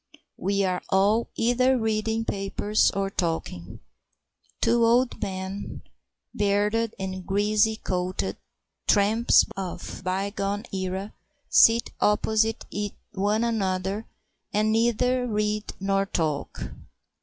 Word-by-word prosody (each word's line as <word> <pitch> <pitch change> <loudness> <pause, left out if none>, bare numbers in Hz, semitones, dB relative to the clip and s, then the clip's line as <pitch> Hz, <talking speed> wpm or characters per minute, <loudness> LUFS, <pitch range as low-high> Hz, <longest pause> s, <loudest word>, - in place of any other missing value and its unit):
We 200 +1 +1
are 185 -1 0
all 205 +4 +3
either 250 +3 +3
reading 220 0 0
papers 200 +1 +1
or 195 0 -2
talking. 115 - -3 0.8
Two 235 0 +3
old 240 +2 +3
men, 190 +1 -5 0.5
bearded 210 +2 +1
and 190 -1 -5
greasy 210 +3 +2
coated, 185 -3 -2 0.5
tramps 215 +3 +4
of 190 -2 -6
a - - -14
bygone 200 +3 -2
era, 190 +2 -3 0.4
sit 230 +1 +5
opposite 220 +1 +1 0.5
one 210 +2 0
another 195 -2 -1 0.4
and 215 +1 +2
neither 245 +3 +2
read 210 -1 -1
nor 195 0 +1
talk. 155 -6 -2
205 Hz, 100 wpm, -26 LUFS, 190-225 Hz, 0.8 s, sit